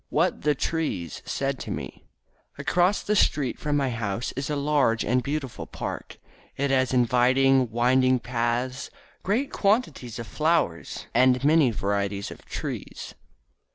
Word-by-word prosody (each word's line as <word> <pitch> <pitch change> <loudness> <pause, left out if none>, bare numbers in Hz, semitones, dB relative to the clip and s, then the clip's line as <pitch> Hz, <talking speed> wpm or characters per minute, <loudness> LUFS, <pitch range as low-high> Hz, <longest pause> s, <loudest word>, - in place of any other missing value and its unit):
"_ - - -44
WHAT - - +1
THE 150 0 +2
TREES 135 - -2
SAID - - -2
TO - - -7
ME - - -6 0.5
Across 180 +3 +1
the 210 - 0
street 140 - +1
from 150 -1 0
my 135 -3 0
home 110 -3 -3
is 135 +2 -3
a 150 - 0
large 140 -6 +1
and 125 +3 +2
beautiful 140 -1 -4
park. - - -6 0.4
It 140 0 0
has 130 -1 +2
inviting, 130 +1 +3
winding 130 +3 +3
paths, 120 +1 -2 0.3
great 235 +9 0
quantities 195 - 0
of 115 - -5
flowers 155 - -1
and 125 +1 +4
many 150 -2 +5
varieties 100 -1 -2
of - - -11
trees. - - -6
130 Hz, 145 wpm, -25 LUFS, 120-150 Hz, 0.5 s, many